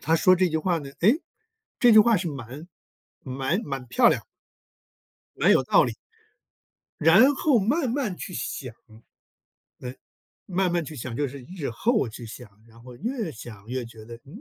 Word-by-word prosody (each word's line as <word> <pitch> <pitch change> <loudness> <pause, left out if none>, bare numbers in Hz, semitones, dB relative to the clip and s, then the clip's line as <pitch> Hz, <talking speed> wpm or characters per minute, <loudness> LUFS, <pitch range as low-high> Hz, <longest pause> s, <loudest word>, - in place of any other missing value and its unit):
他 165 +1 +2
说 185 +3 +5
这 185 0 +2
句 160 - -1
话 170 +2 0
呢， 140 -3 -9
哎， 200 +6 +6 0.7
这 240 -2 +6
句 220 - +8
话 225 +1 +5
是 175 -1 -2
蛮 140 +2 -8 0.6
蛮 135 - -2
蛮 135 -3 -5
漂 125 - +4
亮。 - - 0 1.1
蛮 - - +3
有 - - +4
道 - - +4
理。 - - -2 1.1
然 205 - +6
后 275 -2 +2
慢 250 - 0
慢 240 -8 -2
去 - - -8
想。 125 -8 -5 1.1
嗯， 125 0 -7 0.5
慢 185 -1 0
慢 175 -1 0
去 155 +1 -9
想， 120 -1 -6
就 145 - 0
是 140 +2 -9 0.2
日 150 -8 -3
后 220 - 0
去 115 +2 -9
想， 115 0 -11 0.2
然 115 0 -18
后 125 0 -12
越 225 - -3
想 110 -3 -11
越 125 0 -3
觉 115 -2 -13
得： 115 +1 -10
“嗯， 170 +11 -12
160 Hz, 185 characters per minute, -25 LUFS, 125-200 Hz, 1.1 s, 句